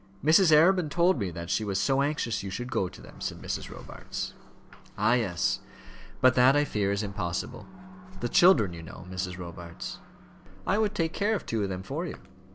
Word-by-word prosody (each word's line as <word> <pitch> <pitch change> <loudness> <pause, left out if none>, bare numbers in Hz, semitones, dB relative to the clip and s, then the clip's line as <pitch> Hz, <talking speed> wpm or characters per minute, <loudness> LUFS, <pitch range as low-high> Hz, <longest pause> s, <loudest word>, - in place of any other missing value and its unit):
"Mrs. 165 +2 +6
Arabin 165 +2 +5
told 170 0 +3
me 100 -4 -1
that 85 0 -6
she 110 - +1
was 100 -2 -1
so 135 +5 +2
anxious 140 -6 -1
you 95 - -5
should 120 +6 -5
go 95 -8 0
to - - -13
them," - - -14
said - - -4
Mrs. - - -4
Robarts. - - -7 0.6
"Ah, 120 - +3
yes; 100 -8 +1 0.6
but 130 0 +6
that 130 +2 +5
I 145 0 +3
fear 100 -6 0
is 100 +1 -1
impossible. 100 +4 -4 0.5
The 120 - -1
children, 120 - +5
you 85 - -8
know, 80 +2 -10
Mrs. 90 0 -3
Robarts." 85 0 -8 0.7
"I 200 - +2
would 210 -1 +1
take 165 -4 0
care 210 +2 +1
of - - -4
two 115 -2 -1
of 100 - -1
them 95 0 -4
for 155 - -4
you." - - -6
120 Hz, 195 wpm, -28 LUFS, 95-155 Hz, 0.7 s, Mrs